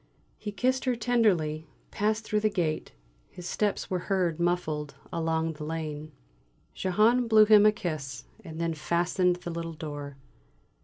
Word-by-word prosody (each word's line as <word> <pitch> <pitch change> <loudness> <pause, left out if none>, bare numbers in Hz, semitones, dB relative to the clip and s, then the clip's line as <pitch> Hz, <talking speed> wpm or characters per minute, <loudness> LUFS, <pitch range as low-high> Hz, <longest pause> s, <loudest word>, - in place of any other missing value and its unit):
He 210 - -5
kissed 255 +5 0
her 255 -1 +2
tenderly, 195 -10 +1 0.2
passed 215 +2 0
through 215 -1 0
the 215 0 +2
gate; 165 -6 -2 0.4
his 180 -1 -9
steps 210 -2 -1
were 185 - +1
heard 180 -4 +1
muffled 160 -4 -1 0.2
along 165 -1 0
the 150 0 -8
lane. 155 -1 -5 0.6
Jehane 220 +6 +2
blew 215 -1 +7
him 210 -1 +7
a - - +6
kiss, 155 -9 -5 0.2
and 160 0 -8
then 165 -1 0
fastened 175 +3 +1
the 175 -1 -7
little 165 0 -4
door. 145 -3 -7
175 Hz, 150 wpm, -28 LUFS, 155-210 Hz, 0.6 s, blew